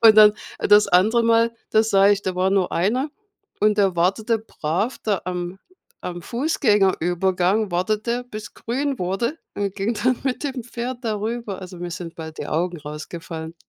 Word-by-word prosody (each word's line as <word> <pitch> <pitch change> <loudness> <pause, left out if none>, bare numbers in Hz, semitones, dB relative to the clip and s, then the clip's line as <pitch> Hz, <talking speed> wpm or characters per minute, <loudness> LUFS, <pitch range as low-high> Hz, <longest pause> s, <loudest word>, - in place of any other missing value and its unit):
Und 220 -1 +8
dann 210 -1 +8 0.2
das 205 +1 +5
andere 215 +6 +4
Mal, 230 0 +4 0.2
da 220 - +5
sah 200 -2 +4
ich 200 -1 +2
da 185 -1 -2
war 185 +1 +2
nur 195 -2 +1
einer 245 - +1 0.5
und 210 0 +3
der 190 -3 +3
wartete 215 +6 +1
brav 200 +2 -2
da 205 -4 +1
am 180 +1 -4 0.4
am 175 -1 -5
Fußgängerübergang, 195 - +1
wartete 215 +7 0
bis 215 0 -8
grün 270 +3 -2
wurde, 195 - -1 0.2
und 200 -1 -2
ging 205 +4 -1
dann 255 +2 +1
mit 265 +2 -1
dem 260 -4 -3
Pferd 245 +1 -5
darüber. 220 -2 -3
Also, 180 -1 -9
mir 175 0 -5
sind 170 -1 -6
bald 160 -1 -8
die - - -4
Augen 175 +2 -1
rausgefallen. 160 +2 -7
205 Hz, 165 wpm, -22 LUFS, 180-230 Hz, 0.5 s, Und